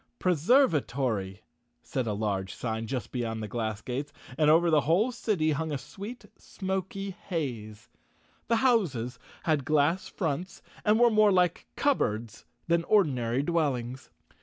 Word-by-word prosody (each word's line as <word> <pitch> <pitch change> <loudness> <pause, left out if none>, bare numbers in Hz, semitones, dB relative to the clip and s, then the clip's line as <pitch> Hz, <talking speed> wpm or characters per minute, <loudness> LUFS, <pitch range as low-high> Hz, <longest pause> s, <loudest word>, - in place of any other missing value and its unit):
" - - -48
Preservatory," 140 - +2 0.4
said 130 -3 -2
a 105 - 0
large 100 -2 -2
sign 110 -1 -3
just 125 -4 -4
beyond 115 -3 -3
the - - -4
glass 110 -1 -3
gates, 135 +4 -4 0.2
and 150 +1 +3
over 165 +2 +5
the 155 -2 +5
whole 185 - +2
city 200 -10 0
hung 155 +2 -2
a 145 - -1
sweet, 205 - -9
smoky 190 0 -4
haze. 120 - -5 0.6
The 230 - +3
houses 140 - +1 0.2
had 155 -4 +1
glass 155 +6 +2
fronts 175 +2 -3 0.2
and 215 +1 +3
were 240 -1 +6
more 215 -1 +5
like 180 -2 +2
cupboards 115 - 0 0.2
than 170 0 +2
ordinary 135 - +2
dwellings. 130 - -1
150 Hz, 140 wpm, -28 LUFS, 120-190 Hz, 0.6 s, were